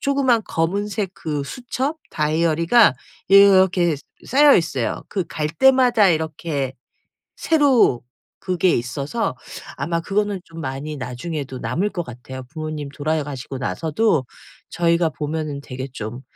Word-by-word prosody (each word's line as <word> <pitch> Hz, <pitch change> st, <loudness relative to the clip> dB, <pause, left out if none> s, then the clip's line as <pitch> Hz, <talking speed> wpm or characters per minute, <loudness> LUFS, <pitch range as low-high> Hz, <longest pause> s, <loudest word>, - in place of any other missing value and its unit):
조그마한 270 Hz, -4 st, +2 dB
검은색 200 Hz, +4 st, -1 dB
그 150 Hz, -5 st, -4 dB
수첩 265 Hz, -, -4 dB
다이어리가 165 Hz, -, +3 dB, 0.3 s
이렇게 190 Hz, -4 st, +5 dB, 0.3 s
쌓여 285 Hz, +2 st, +6 dB
있어요. 150 Hz, -8 st, -1 dB
그 190 Hz, -4 st, -1 dB
갈 150 Hz, -1 st, -2 dB
때마다 245 Hz, +1 st, +4 dB
이렇게 155 Hz, -4 st, -1 dB, 0.6 s
새로 280 Hz, -, +3 dB, 0.4 s
그게 185 Hz, -1 st, +1 dB
있어서 140 Hz, -, -2 dB, 0.4 s
아마 165 Hz, +4 st, -1 dB
그거는 205 Hz, +2 st, -1 dB
좀 165 Hz, 0 st, -10 dB
많이 145 Hz, +2 st, -5 dB
나중에도 130 Hz, +1 st, -5 dB
남을 165 Hz, -, -1 dB
것 175 Hz, -, -3 dB
같아요. 125 Hz, +1 st, -9 dB
부모님 155 Hz, -2 st, -5 dB
돌아가시고 145 Hz, -3 st, -3 dB
나서도 155 Hz, -, 0 dB, 0.4 s
저희가 170 Hz, -1 st, +2 dB
보면은 150 Hz, -1 st, -4 dB
되게 130 Hz, 0 st, -6 dB
좀 115 Hz, +3 st, -6 dB
165 Hz, 280 characters per minute, -21 LUFS, 140-200 Hz, 0.6 s, 쌓여